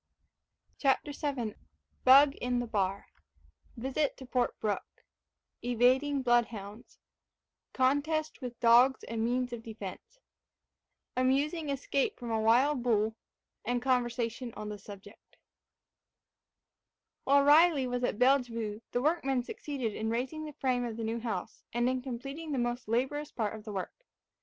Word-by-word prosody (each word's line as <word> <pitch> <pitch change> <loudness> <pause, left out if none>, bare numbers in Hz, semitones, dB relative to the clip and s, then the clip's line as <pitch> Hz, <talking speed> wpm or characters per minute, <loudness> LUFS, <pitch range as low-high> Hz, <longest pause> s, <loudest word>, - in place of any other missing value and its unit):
CHAPTER 275 +1 +2
VII 275 -7 -3 0.5
BUG 275 +2 +8
IN 245 0 -1
THE 245 - -2
BAR 200 -3 -2 0.7
VISIT 265 +4 -1
TO 265 - -10
PORT 250 -1 -1
BROOKE 210 -2 -4 0.6
EVADING 255 +4 +2
BLOODHOUNDS 235 -3 -1 0.8
CONTEST 290 +5 0
WITH 245 -2 -6
DOGS 245 +3 +5
AND 225 -1 -3
MEANS 245 +1 0
OF 235 - -5
DEFENCE 225 - -9 1.0
AMUSING 285 +5 +1
ESCAPE 275 0 -1
FROM 240 -1 -6
A 220 -1 +1
WILD 250 +5 +3
BULL 220 -2 +1 0.5
AND 245 0 -1
CONVERSATION 240 -2 -1
ON 210 0 -6
THE 210 -1 -6
SUBJECT 200 +1 -13 1.9
While 280 +1 +5
Riley 300 -1 +6
was 245 0 -2
at 245 - 0
Bellevue 235 -5 +1
the 245 - 0
workmen 275 -5 +1
succeeded 255 -4 -4
in 220 +2 -3
raising 265 +7 -2
the 300 - -8
frame 255 -3 0
of 230 -2 -4
the 230 - -4
new 225 +1 -2
house, 220 -6 -5
and 240 +1 +1
in 255 0 0
completing 275 +5 -6
the - - -1
most 240 0 -2
laborious 265 +6 -1
part 215 -3 -2
of 220 -1 -9
the 215 - -6
work. 195 - -6
245 Hz, 140 wpm, -31 LUFS, 230-275 Hz, 1.9 s, BUG